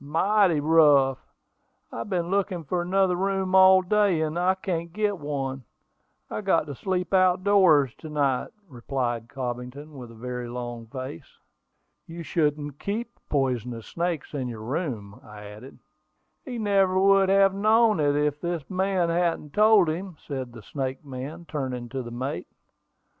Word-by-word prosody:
"Mighty 180 +3 +2
rough! 145 -4 +4 0.7
I - - -6
have 115 - -5
been 175 -2 -1
looking 195 -3 -1
for 175 +5 -1
another 185 +1 +2
room 190 0 -1
all 190 0 +7
day, 200 -2 +2
and 155 +2 -2
I 185 +2 +2
can't 170 -3 -4
get 205 0 -1
one. 135 -3 -4 0.6
I've 210 - -5
got 165 -5 +2
to 145 - -6
sleep 180 +5 -3
out 185 -1 +3
doors 170 - +4
to 155 - -9
night," 140 -4 0 0.2
replied 120 -3 -3
Cobbington, 125 +3 -6
with 125 -4 -9
a 115 - -13
very 125 +1 -5
long 120 -1 -6
face. 130 -6 -8 0.7
"You 170 +1 -8
shouldn't 150 -3 -1
keep 225 +4 -3 0.2
poisonous 125 -5 -1
snakes 170 -3 -3
in 135 -3 -3
your 115 -3 -7
room," 120 - -4
I 105 -1 -11
added. 105 +6 -11 0.7
"He 250 -3 -5
never 195 -3 +2
would 195 0 +4
have 195 0 +4
known 215 0 +3
it 145 -1 +2
if 150 0 0
this 170 -4 -3
man 185 -2 +1
hadn't 165 -3 -1
told 210 -3 +5
him," 170 +2 -4
said 130 -3 -5
the 115 -3 -11
snake 135 +3 -5
man, 140 +6 -7
turning 130 -5 -4
to 130 +2 -4
the 120 - -8
mate. 120 -4 -4
155 Hz, 160 wpm, -25 LUFS, 130-190 Hz, 0.7 s, all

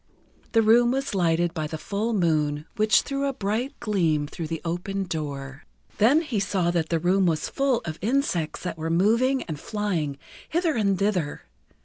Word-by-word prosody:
The 225 -1 +5
room 235 +2 +5
was 270 0 -1
lighted 170 -2 +1
by 155 -3 -2
the 160 - -5
full 210 +7 -2
moon, 155 -6 +1
which 215 -1 +4
threw 275 0 -2
a 275 - -1
bright 230 +3 -2
gleam 165 -8 +1
through 160 +2 -6
the 165 0 -3
open 180 +4 -2
door. 145 -5 -5 0.4
Then 255 +9 +5
he 245 -9 -2
saw 190 -3 0
that 170 -2 -1
the 165 - +2
room 185 +3 +2
was 160 -2 0
full 270 -3 +1
of 155 -1 -5
insects 215 - 0
that 180 -3 -4
were 160 +1 -2
moving 230 +10 +2
and 155 -4 -6
flying 175 -10 -2 0.3
hither 335 -1 +1
and 200 -4 +2
thither. 185 -7 -1
190 Hz, 175 wpm, -25 LUFS, 160-225 Hz, 0.4 s, The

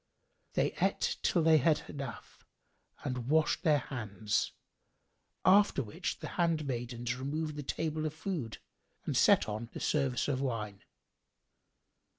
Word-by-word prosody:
They - - +2
ate - - +1
till 170 - +2
they 160 -1 +6
had 150 +2 +2
enough 140 -1 -8 0.6
and 125 -4 -3
washed 155 +2 +3
their 155 -5 +4
hands, 110 -6 -2 0.9
after 195 -7 +5
which 105 - -4
the - - -4
handmaidens 125 -7 -1
removed 150 +3 -3
the 145 - -4
table 155 +2 -2
of 155 - -5
food 155 - -4 0.5
and - - -1
set - - +5
on 110 +2 -4
the - - -5
service 135 -5 +1
of 135 -2 0
wine. 110 -6 -3
140 Hz, 130 wpm, -32 LUFS, 120-155 Hz, 0.9 s, they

